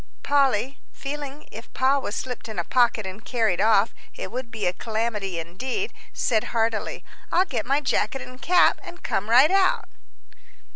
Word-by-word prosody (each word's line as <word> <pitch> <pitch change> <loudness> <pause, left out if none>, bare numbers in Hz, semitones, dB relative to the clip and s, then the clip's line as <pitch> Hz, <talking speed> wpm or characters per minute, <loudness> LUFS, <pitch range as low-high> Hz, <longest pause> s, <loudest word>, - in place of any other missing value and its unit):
Polly, 275 -2 +2
feeling, 285 +1 -6
if 225 +2 -10
Pa 265 +2 +3
were 260 - -4
slipped 250 +1 -5
in 220 - -7
a - - 0
pocket 240 -4 +2
and 190 +3 -7
carried 220 -8 +1
off, 220 -1 +4 0.2
it - - -6
would 250 -1 -5
be 225 -3 -4
a 180 - +2
calamity 215 -3 -2
indeed, 250 - -4 0.2
said 225 -5 +1
heartily, 225 -1 -1 0.3
"I'll 365 - +4
get 240 - -3
my 280 +3 +2
jacket 275 -1 0
and 255 +1 -12
cap 355 0 +4
and 350 +1 -11
come 205 +3 -1
right 260 +8 +7
out." 385 -1 +3
245 Hz, 165 wpm, -25 LUFS, 220-275 Hz, 0.3 s, right